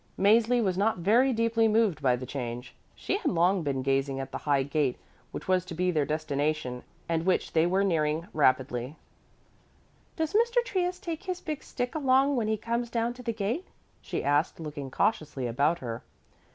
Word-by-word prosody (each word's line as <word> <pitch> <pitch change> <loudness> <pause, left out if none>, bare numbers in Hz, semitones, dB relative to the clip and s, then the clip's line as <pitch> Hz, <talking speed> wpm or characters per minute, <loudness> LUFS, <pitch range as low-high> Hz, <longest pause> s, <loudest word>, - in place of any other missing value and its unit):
Mäzli 230 +4 +4
was 190 -2 0
not 215 +1 +2
very 230 +10 +3
deeply 230 -1 +2
moved 215 -7 +2
by 130 -3 +3
the 125 +1 -6
change. 125 -2 -5 0.2
She 390 - -1
had - - 0
long 180 +2 +2
been 135 -4 -2
gazing 135 0 0
at 135 - -5
the - - -4
high 140 -2 +4
gate 140 -2 0 0.3
which - - -8
was 185 -1 +2
to 170 - -7
be 180 +2 +1
their 150 -4 0
destination 150 -4 -1 0.3
and 165 -1 0
which 185 +1 0
they 160 +1 +4
were 190 +2 +2
nearing 160 -3 +1
rapidly. 130 -1 +1 1.2
"Does 320 0 -2
Mr. 475 +2 +3
Trius 360 -4 -1
take 335 +2 -6
his 365 -1 -3
big 305 -5 -5
stick 245 -1 -4
along 275 -1 +3
when 230 -4 0
he 220 0 +1
comes 235 +2 -2
down 235 0 -1
to 250 - -11
the 235 -1 -2
gate?" 225 - -3 0.3
she - - -4
asked, 145 +5 +1
looking 150 -4 -6
cautiously 145 - -1
about 140 +8 +1
her. 115 -1 -4
180 Hz, 185 wpm, -28 LUFS, 145-235 Hz, 1.2 s, Mäzli